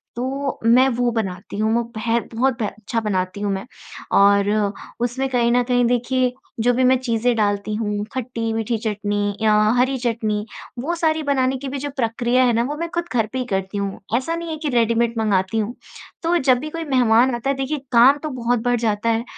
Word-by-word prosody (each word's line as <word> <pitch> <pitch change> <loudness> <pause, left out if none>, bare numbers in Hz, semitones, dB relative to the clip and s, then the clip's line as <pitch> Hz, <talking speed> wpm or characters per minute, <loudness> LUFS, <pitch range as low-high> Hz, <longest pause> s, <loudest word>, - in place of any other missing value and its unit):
तो 270 +3 -3
मैं 250 +3 +6
वो 245 -1 +1
बनाती 190 -2 -5
हूँ, 220 +1 +1
म 235 +1 +2
पै 230 -1 -9
है 230 +1 +2
बहुत 260 +3 +2
ब 215 - +1
अच्छा 220 +3 -3
बनाती 190 -2 -2
हूँ 205 -1 0
मैं 190 +3 -4 0.5
और 200 0 +5 0.5
उसमें 245 +3 -1
कहीं 240 -2 +2
न 245 +1 +4
कहीं 245 0 +2
देखिए 245 +1 +1 0.3
जो 245 +2 +3
भी 255 +2 +1
मैं 255 +1 +5
चीज़ें 240 -1 0
डालती 205 -1 0
हूँ, 210 -1 -2
खट्टी-मीठी 230 -2 -2
चटनी 205 -1 -2
या 215 -1 +4 0.2
हरी 260 +2 +2
चटनी, 220 -4 -1 0.3
वो 320 +8 -2
सारी 315 -2 0
बनाने 265 -2 +1
की 275 +2 -7
भी 280 - -4
जो 290 +2 -4
प्रक्रिया 240 +1 +1
है 240 - +3
ना 230 +1 +2
वो 285 +4 -3
मैं 335 +1 -3
ख़ुद 345 0 -1
घर 225 -3 +1
पे 260 - -2
ही 255 - -2
करती 195 -2 -3
हूँ। 200 -1 -3 0.2
ऐसा 295 +6 -2
नहीं 335 0 -5
है 315 - -4
कि 305 -1 -3
रेडीमेड 235 -1 +2
मँगाती 205 -2 +1
हूँ। 215 +3 -2 0.5
तो 345 +1 +2
जब 260 -4 +3
भी 305 - -5
कोई 330 +1 -5
मेहमान 250 -2 +3
आता 240 +3 -3
है 275 - +1
देखिए 270 +3 -2
काम 250 +4 +6
तो 310 - -2
बहुत 245 -3 0
बढ़ 245 -1 +1
जाता 220 0 0
है 225 0 +1
235 Hz, 215 wpm, -21 LUFS, 220-260 Hz, 0.5 s, मैं